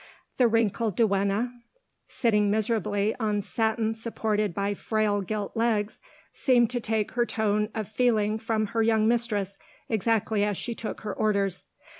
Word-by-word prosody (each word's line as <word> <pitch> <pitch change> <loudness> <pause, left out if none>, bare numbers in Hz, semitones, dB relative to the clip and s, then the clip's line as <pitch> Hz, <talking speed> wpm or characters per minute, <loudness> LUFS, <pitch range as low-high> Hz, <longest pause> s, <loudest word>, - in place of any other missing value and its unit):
The 250 - +5
wrinkled 225 -2 +1
duenna, 200 +2 +1 0.6
sitting 210 -4 +1
miserably 210 -1 0
on 210 -3 0
satin 220 0 0
supported 220 -2 -1
by 200 +3 -1
frail 210 0 0
gilt 205 +1 -4
legs, 220 -2 0 0.3
seemed 245 -4 +3
to 245 - -1
take 220 -2 -1
her 240 - +1
tone 210 -1 0
of 215 -3 -3
feeling 220 -2 +1
from 220 -1 0
her 225 - +2
young 220 -1 +3
mistress, 210 -5 0 0.3
exactly 220 -1 +1
as 205 -2 0
she 240 - -3
took 225 - -6
her 210 -2 -4
orders. 200 -3 0
215 Hz, 145 wpm, -27 LUFS, 205-225 Hz, 0.6 s, The